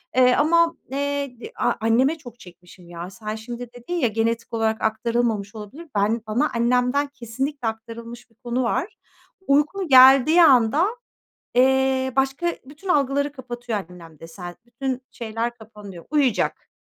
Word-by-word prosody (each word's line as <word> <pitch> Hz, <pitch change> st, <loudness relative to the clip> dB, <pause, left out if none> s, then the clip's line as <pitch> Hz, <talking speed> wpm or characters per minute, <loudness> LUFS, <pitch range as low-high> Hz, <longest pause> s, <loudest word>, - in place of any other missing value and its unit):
Eee, 250 Hz, -1 st, +5 dB
ama, 335 Hz, +2 st, +3 dB, 0.2 s
eee, 280 Hz, -3 st, -3 dB
de 455 Hz, -, -9 dB
a -, -, +1 dB
anneme 250 Hz, +8 st, +2 dB
çok 245 Hz, -5 st, -13 dB
çekmişim 175 Hz, 0 st, -16 dB
ya. 170 Hz, +1 st, -7 dB
Sen 215 Hz, +1 st, -6 dB
şimdi 240 Hz, +2 st, -8 dB
dedin 245 Hz, +8 st, -8 dB
ya, 330 Hz, -8 st, +2 dB
"Genetik 230 Hz, +2 st, -2 dB
olarak 220 Hz, -1 st, 0 dB
aktarılmamış 220 Hz, -2 st, -1 dB
olabilir." 245 Hz, +11 st, -9 dB
Ben 210 Hz, +3 st, +1 dB
bana 245 Hz, +8 st, +1 dB
annemden 250 Hz, +4 st, +1 dB
kesinlikle 265 Hz, +1 st, -4 dB
aktarılmış 230 Hz, +2 st, -7 dB
bir 225 Hz, -, -31 dB
konu 245 Hz, +2 st, -2 dB
var. 335 Hz, -, -2 dB, 0.5 s
Uykum 300 Hz, +7 st, +2 dB
geldiği 270 Hz, +5 st, +7 dB
anda, 270 Hz, -, +5 dB, 0.7 s
eee, 265 Hz, +1 st, +3 dB
başka 270 Hz, +5 st, 0 dB, 0.2 s
bütün 295 Hz, +8 st, -12 dB
algıları 285 Hz, -3 st, +1 dB
kapatıyor 240 Hz, -4 st, -5 dB
annem 165 Hz, -4 st, -14 dB
de 165 Hz, -, -9 dB
sen 175 Hz, +1 st, -9 dB
Bütün 255 Hz, +2 st, -4 dB
şeyler 230 Hz, 0 st, -4 dB
kapanıyor, 210 Hz, -6 st, -12 dB
uyuyacak. 280 Hz, -7 st, 0 dB
245 Hz, 145 wpm, -23 LUFS, 225-275 Hz, 0.7 s, geldiği